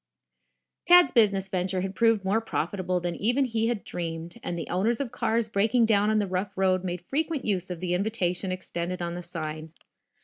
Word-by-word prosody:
Tad's 355 -6 +7
business 200 -4 +3
venture 185 0 -1
had 190 +1 -3
proved 225 -2 +2
more 205 +4 +2
profitable 185 -5 -2
than 175 0 -3
even 245 +6 +2
he 225 -2 0
had 235 -3 -2
dreamed, 165 +3 -5
and 175 - -4
the 165 - -5
owners 215 +6 +1
of 270 -4 -3
cars 230 -1 0
breaking 220 +3 +2
down 210 -1 +3
on 215 - +2
the 210 - +2
rough 190 +1 -3
road 185 -1 +2
made 180 -1 -3
frequent 300 - -2
use 190 -3 -1
of 180 -2 -6
the 180 -1 -1
invitation 185 -2 -1
extended 180 -1 -4
on 170 0 -3
the 175 - -5
sign. 160 -2 -6
195 Hz, 195 wpm, -27 LUFS, 180-225 Hz, -, Tad's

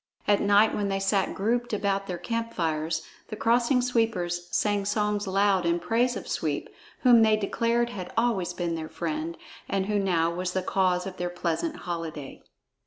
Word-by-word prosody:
At 205 -1 +4
night 205 +2 +4
when 205 -1 -1
they 195 0 0
sat 195 0 +1
grouped 240 +4 0
about 200 -1 0
their 180 - -3
campfires, 165 -9 -2 0.2
the - - -6
Crossing 240 +3 +2
Sweepers 195 -8 0
sang 205 +1 +1
songs 210 0 0
loud 195 0 +2
in 170 0 +1
praise 240 +6 +1
of - - -8
Sweep, - - -2 0.3
whom 245 -3 +7
they 220 -1 +5
declared 235 +3 0
had 185 -6 -6
always 225 -6 +1
been 175 -1 -2
their 160 -1 -4
friend 160 0 -3 0.3
and 195 -1 0
who 210 0 0
now 170 -4 +1
was 180 +1 -3
the 185 - -1
cause 180 -1 +1
of 190 -1 -7
their 175 0 -2
pleasant 175 - -2
holiday. 165 -5 -5
195 Hz, 175 wpm, -27 LUFS, 175-225 Hz, 0.3 s, whom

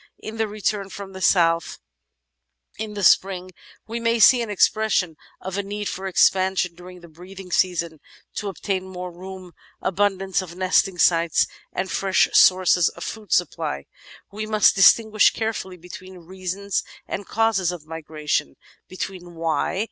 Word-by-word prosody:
In 220 +1 -8
the 220 0 0
return 205 -1 -2
from 195 0 -9
the 190 - -9
south 165 -3 +2 1.0
in 215 -1 -5
the 205 - -4
spring 185 0 +3 0.3
we 230 +1 -5
may 230 0 +1
see 240 +2 +6
an 230 - -4
expression 205 -4 +1 0.2
of 190 +1 -5
a - - +1
need 205 +1 -5
for 190 +1 -4
expansion 185 -1 +2
during 180 +1 -13
the 170 - -13
breeding 180 +3 -12
season 170 -3 0 0.2
— - - -32
to 210 - -3
obtain 190 -1 -3
more 180 -1 -7
room, 185 +1 -10 0.3
abundance 195 0 0
of 175 -2 -10
nesting 185 0 +1
sites, 170 -2 +3 0.3
and 190 - -3
fresh 195 -1 +2
sources 180 -2 +5
of - - -10
food 215 -4 -7
supply. 70 0 -1 0.5
We 215 +2 -5
must 215 -1 +4
distinguish 215 +2 +5
carefully 220 -5 -4
between 185 +2 -11
reasons 190 +2 -3 0.3
and 200 - -5
causes 220 -5 +1
of 170 -4 -9
migration 155 - -3 0.2
— - - -37
^between 185 -2 -6
"why?" 165 +2 -1
190 Hz, 155 wpm, -23 LUFS, 180-205 Hz, 1.0 s, see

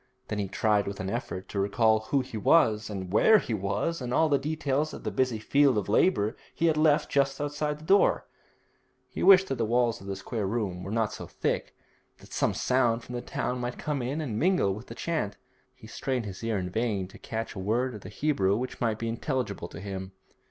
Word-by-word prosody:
Then 105 - -2
he 100 - -1
tried 105 +1 +1
with 100 0 -5
an 95 +1 -3
effort 115 -6 -4
to 100 - -3
recall 110 +2 +3
who 140 - +3
he 130 -2 -9
was, 110 -2 +3
and 95 -2 -5
where 220 - +6
he 120 - -2
was, 105 - -1
and 125 -1 -4
all 160 +5 +3
the 140 -2 +3
details 150 0 -1
of - - -10
the 110 - -2
busy 125 +2 +1
field 140 +3 +3
of 105 - -1
labour 110 - +2 0.2
he 165 - 0
had 160 -2 +4
left 155 0 +3
just 135 -1 +1
outside 145 +1 -2
the 155 - -13
door. 195 +4 +4 0.9
He - - -5
wished 190 -1 +7
that 135 - -2
the - - +2
walls 120 0 +1
of 95 - -10
the 100 - -3
square 100 +1 -3
room 100 -4 -2
were - - -6
not 110 0 0
so - - -7
thick, - - -2 0.4
that - - -15
some - - +1
sound 120 -3 +1
from 125 - -9
the 120 - -3
town 125 +1 -3
might 120 0 -4
come 150 -3 -2
in 135 +6 -2
and 115 -8 -3
mingle 180 - +2
with 110 +5 -9
the - - -8
chant. 155 -12 -2 0.4
He 130 -3 -15
strained 125 +1 -3
his 100 +1 -7
ear 115 -2 0
in 90 -1 -3
vain 105 -3 -1
to - - -14
catch 115 0 -4
a - - -7
word 120 +6 0
of 105 - -8
the - - -9
Hebrew 105 -4 +1
which 130 +2 -5
might 115 -3 +1
be 115 - -3
intelligible 115 - -2
to - - -10
him. 95 -1 -6
115 Hz, 230 wpm, -28 LUFS, 105-140 Hz, 0.9 s, wished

